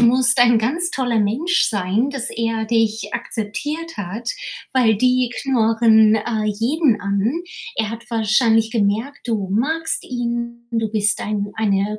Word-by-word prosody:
musst 245 +1 +4
ein 240 -2 +6
ganz 320 +11 0
toller 245 -4 0
Mensch 265 - +1
sein, 205 +5 0
dass 270 -4 -3
er 225 -1 -2
dich 225 -1 0
akzeptiert 290 +8 -4
hat, 205 +5 -4 0.4
weil 230 -5 +3
die 255 +1 +2
knurren, 225 -4 +4
äh, 220 0 -1
jeden 235 +4 +1
an. 200 - -1 0.3
Er 220 -1 -1
hat 230 0 -7
wahrscheinlich 225 0 +2
gemerkt, 225 +4 -1
du 200 -4 -1
magst 315 +10 -1
ihn, 235 -1 -4
du 225 -2 -1
bist 210 -1 +1
ein 205 -1 -2
eine 210 -1 0
225 Hz, 140 wpm, -20 LUFS, 215-250 Hz, 0.4 s, ein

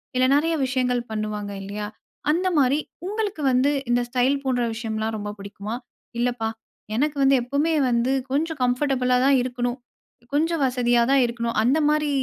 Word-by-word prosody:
இல்ல 255 0 +4
நெறைய 325 +3 +2
விஷயங்கள் 250 -1 0
பண்ணுவாங்க 215 -1 -3
இல்லையா? 205 +1 -5 0.4
அந்த 355 +4 +1
மாரி 275 +1 +3 0.3
உங்களுக்கு 415 -4 -2
வந்து 255 +3 +3 0.2
இந்த 245 0 +3
ஸ்டைல் 255 +3 +2
போன்ற 250 -2 +1
விஷயம்லாம் 220 -1 -3
ரொம்ப 205 0 -4
புடிக்குமா? 200 +3 -6 0.4
இல்லப்பா 240 -2 0 0.5
எனக்கு 290 +3 0
வந்து 270 0 +5
எப்பவுமே 285 +6 0 0.2
வந்து 240 +1 +1 0.2
கொஞ்சம் 310 +1 -1
கம்ஃபர்டபுளா 250 0 +1
தான் 275 -1 +5
இருக்கணும். 245 0 -2 0.5
கொஞ்சம் 325 +2 +1
வசதியா 245 -2 +2
தான் 275 -1 +5
இருக்கணும். 235 -1 -3
அந்த 255 +6 +3
மாதிரி 300 0 +1
250 Hz, 145 wpm, -24 LUFS, 235-285 Hz, 0.5 s, வந்து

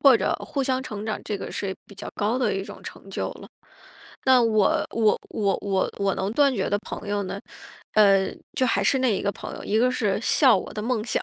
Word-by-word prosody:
或 270 -4 +7
者 - - 0
互 275 - -2
相 260 -1 0
成 210 -4 -6
长 215 -1 -3
这 210 - -2
个 - - -6
是 190 -2 -3
比 200 - -14
较 195 - -7
高 215 +4 0
的 250 - +1
一 195 - -2
种 - - -10
成 - - -10
就 - - -2
了。 - - -12 0.8
那 260 -2 +6
我 215 -3 +3
我 220 -2 +2
我 200 -3 +1
我 195 -2 0
我 200 -1 +1
能 195 +2 -1
断 280 +2 +4
绝 195 - -1
的 205 - +2
朋 210 -1 -7
友 205 0 0
呢， 185 - -5 0.5
呃， 195 -2 +5 0.3
就 255 - +3
还 200 -4 +1
是 265 +7 +3
那 245 -6 +2
一 - - -3
个 200 - +1
朋 - - -8
友， - - -8
一 215 - +1
个 250 +2 +4
是 210 -5 0
笑 255 +1 +5
我 - - -5
的 210 - -4
梦 225 -2 -1
想， 235 - -1
215 Hz, 255 characters per minute, -25 LUFS, 200-250 Hz, 0.8 s, 或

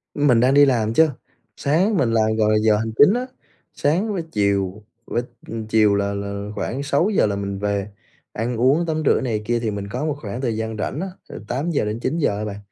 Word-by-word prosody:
Mình 140 -6 +4
đang 130 +3 +3
đi 145 - +7
làm 115 -4 +1
chứ. 160 +5 +5 0.5
Sáng 180 +9 +1
mình 125 -10 +2
làm, 110 -1 +2
gọi 110 -1 +2
là, 110 - +4
giờ 110 -1 +4
hành 110 +1 -2
chính 185 - +6
á. 250 +1 -2 0.5
Sáng 185 +9 0
với 180 -4 -2
chiều, 100 -1 0 0.2
vớ - - -1 0.5
chiều 110 -2 +4
là 100 0 0
là 100 0 -5
khoảng 135 +3 -3
6 145 +8 +1
giờ 195 - +3
là 100 -1 -1
mình 100 -1 -4
về, 100 0 -2 0.4
ăn 115 +2 -2
uống 140 +8 +3
tắm 155 -1 -1
rửa - - +4
này 110 -5 -2
kia 120 +2 0
thì 115 - -1
mình 100 -1 -5
có 125 +8 -3
một 150 -2 -1
khoảng 110 0 -5
thời 120 -5 -1
gian 110 0 -3
rảnh 125 +7 -3
á, 190 - -3 0.2
từ - - -8
8:00-9:00 130 -3 -1
á 105 - -3
bạn. 100 -1 -5
115 Hz, 215 wpm, -21 LUFS, 105-145 Hz, 0.5 s, đi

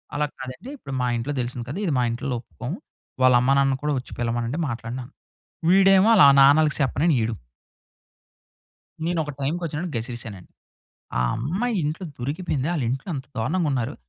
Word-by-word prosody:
అలా 150 0 +1
కాదండి 130 - -8
ఇప్పుడు 140 - -8
మా 125 - +1
ఇంట్లో 125 +6 -3
దెలిసింది 120 0 -4
కదా! 155 - -4
ఇది 160 - 0
మా - - +2
ఇంట్లో 125 +2 -3
ఒప్పుకోము 85 - -7 0.5
వాళ్ళమ్మ 125 +1 +5
నాన్న 135 -1 +2
కూడా 150 - +1
ఒచ్చి 125 - -12
పిలవమనండి 120 +3 -1
మాట్లాడిన. 115 +2 -5 0.7
వీడేమో 195 +2 +6
వాళ్ళ 195 -9 +8 0.2
నాన్నకి 150 +3 +5
సెప్పనని 145 +4 +2
ఈడూ. 110 +1 -1 1.7
నేనొక 160 -4 -1
టైమ్‌కోచ్చిన్నపుడు 160 +1 -3
గసిరెసానండి. 115 -5 -7 0.7
ఆ - - +2 0.2
అమ్మాయి 190 - -1
ఇంట్లో 155 +5 -3
దొరికిపోయింది 140 +2 -2
ఆలింట్లో 135 +3 -2
అంత 135 -1 -6
దారుణంగున్నారు. 140 -2 0
135 Hz, 135 wpm, -24 LUFS, 120-160 Hz, 1.7 s, వాళ్ళ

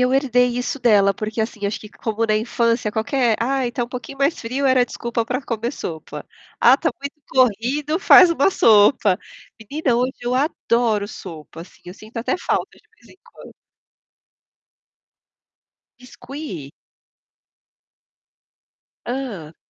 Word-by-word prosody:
eu 250 0 +2
herdei 250 -3 +2
isso 250 +3 -3
dela, 205 -5 +4
porque, 215 +3 -4
assim, 220 -2 -3
acho 205 - -3
que 210 - -11
como 225 +1 -3
na 215 -1 +2
infância 230 0 0
qualquer: 230 +1 +1
"Ai, 260 +1 0
está 240 +1 -3
um - - -13
pouquinho 250 +2 -8
mais 280 +4 +1
frio.", 255 +4 -3
era 260 -1 +4
desculpa 235 -1 -3
para 250 +4 -3
comer 235 0 -3
sopa, 160 - -7 0.4
"Ah, - - +7
está - - 0
muito 280 +1 -6
corrido.", 260 - +1
faz 365 -2 +7
uma 335 +2 +2
sopa. 210 - +4 0.4
Menina, 255 +3 -1
hoje 250 +2 0
eu 245 +1 -2
adoro 235 -6 0
sopa, 165 -5 -10
assim, 175 - -18
eu 180 - -9
sinto 215 +4 -15
até 230 - -1
falta - - -2
de - - -29
vez - - -21
em - - -19
quando. - - -15 2.5
Biscuit? 250 - -9 2.3
Hã. 225 - -5
240 Hz, 140 wpm, -21 LUFS, 215-265 Hz, 2.5 s, Ah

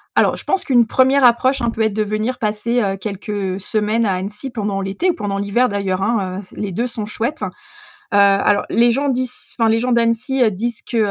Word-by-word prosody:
Alors, - - +3
je - - -8
pense 385 - 0
qu'une 245 -4 +4
1re 265 +3 +3
approche, 255 +2 +4
hein, 235 - +1
peut 225 - -4
être 220 -2 +1
de 215 - 0
venir 215 +4 -2
passer, 225 +3 0
heu, 195 -1 -1
quelques, 200 +2 -7
heu, 195 -3 -2
semaines 215 +3 0
à 195 - +1
Annecy 210 +7 -5
pendant 205 -4 -2
l'été 195 - -1
ou 350 - +1
pendant 200 -2 -3
l'hiver 205 +5 +1
d'ailleurs, 195 -2 -1
hein. 195 -4 -1
Heu, 190 -2 -13
les 205 -2 -4
2 230 +7 -1
sont 225 -4 -4
chouettes. 235 +8 -3
Heu, - - -2 0.7
alors 200 0 +4
les 240 +1 +4
gens 280 +4 0
disent 255 -1 -4
enfin, 225 -1 +4
les 225 +1 +3
gens 250 +1 -1
d'Annecy, 235 +3 +2
heu, 220 - +3
disent 230 +4 -4
que, 235 - -4
220 Hz, 225 wpm, -19 LUFS, 200-245 Hz, 0.7 s, qu'une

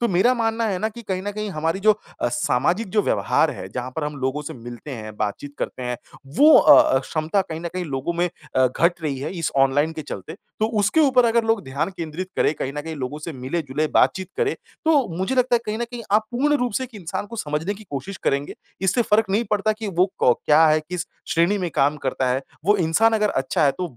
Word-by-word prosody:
तो 235 - +1
मेरा 190 +7 +3
मानना 225 -1 0
है 190 -2 -1
ना 220 - 0
कि 235 +2 -11
कहीं 190 -2 -3
न 205 - -3
कहीं 210 0 -4
हमारी 165 +3 -1
जो 215 +1 +6 0.3
अ, - - +1
सामाजिक 170 - 0
जो 210 - +3
व्यवहार 100 - +2
है, 95 - -7
जहाँ 125 +4 -5
पर 155 - -1
हम 150 -1 -4
लोगों 135 +3 -1
से - - -6
मिलते 120 +4 -9
हैं 110 -4 -7
बातचीत 140 +8 -4
करते 130 - -4
हैं 125 0 -2 0.4
वो 300 +1 +8
अ - - +8 0.2
अ, - - +5
क्षमता 155 +8 -1
कहीं 160 -2 -7
न 170 - -4
कहीं 180 -1 -2
लोगों 135 +2 -3
में 175 +1 0 0.3
अ, 130 0 +5
घट 170 +7 +1
रही 140 -4 -2
है 135 - -4
इस 165 - -1
ऑनलाइन 140 +4 +3
के 155 -1 -6
चलते, 155 - -7
तो 215 +2 -4
उसके 210 +11 +3
ऊपर 260 -5 +5
अगर 230 0 +2
लोग 225 -3 +1
ध्यान 140 +8 -2
केंद्रित 170 +3 -5
करें - - +3
कहीं 135 -1 -4
न - - -1
कहीं 160 0 -6
लोगों 135 +3 -4
से 160 +1 -6
मिले-जुले 140 +2 -2
बातचीत 190 0 +3
करें, 440 -3 +1 0.3
तो 295 -7 +3
मुझे 190 +8 -1
लगता 250 -1 +3
है - - -2
कहीं 215 +1 -2
न 235 - -1
कहीं 235 0 -8
आप 215 +1 +3
पूर्ण 290 +5 +2
रूप 245 -3 -1
से 260 - -1
एक 245 -3 -13
इंसान 180 +4 -4
को 230 - -9
समझने 155 +4 -2
की 215 +2 -13
कोशिश 145 +8 -5
करेंगे। 140 +1 0 0.3
इससे 195 +6 +2
फ़र्क 215 -2 +2
नहीं 220 +4 +2
पड़ता 210 +1 +2
कि 215 -1 -6
वो 180 0 +2
को 125 - +5
क्या 155 +2 +4
है 155 0 +4
किस 175 +3 -5 0.2
श्रेणी 175 +5 +2
में 175 -3 -2
काम 145 +2 +2
करता 130 -1 0
है, 130 +2 0 0.2
वो 205 +1 +4
इंसान 185 +6 +3
अगर 210 -1 +2
अच्छा 150 +4 0
है 140 - +4
तो 175 -10 -4
175 Hz, 245 wpm, -22 LUFS, 145-215 Hz, 0.4 s, वो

